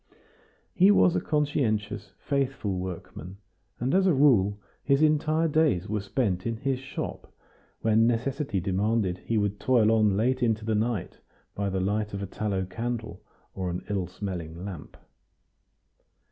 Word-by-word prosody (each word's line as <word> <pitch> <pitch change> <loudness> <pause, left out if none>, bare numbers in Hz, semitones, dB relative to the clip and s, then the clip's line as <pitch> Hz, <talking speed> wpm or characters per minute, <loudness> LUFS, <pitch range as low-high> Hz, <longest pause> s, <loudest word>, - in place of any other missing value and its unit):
He 190 -1 +5
was 180 -3 +5
a - - +1
conscientious, 135 -9 -1
faithful 130 -9 -1
workman, 90 0 -7 0.4
and, 125 +3 0
as 190 0 +4
a 175 - +4
rule, 105 -8 +4 0.2
his 140 +2 +3
entire 155 +1 +2
days 150 - +2
were 105 0 -1
spent 100 -2 -1
in 115 -1 -2
his 135 +2 -1
shop; 135 +1 -6 0.5
when 110 +1 +4
necessity 125 -1 -1
demanded 95 0 0
he 115 +4 -2
would 105 -1 0
toil 115 -4 +3
on 105 -3 +3
late 130 +4 +1
into 110 -3 +1
the 110 - 0
night 110 -1 -1 0.3
by 100 -1 -2
the 95 0 -1
light 105 +2 -1
of 100 - -4
a - - -2
tallow 95 -1 -2
candle, 110 -1 -5 0.3
or 95 -2 -3
an 90 +1 -4
ill 95 -3 -1
smelling 90 -2 -6
lamp. 90 -7 -8
110 Hz, 150 wpm, -27 LUFS, 95-130 Hz, 0.5 s, He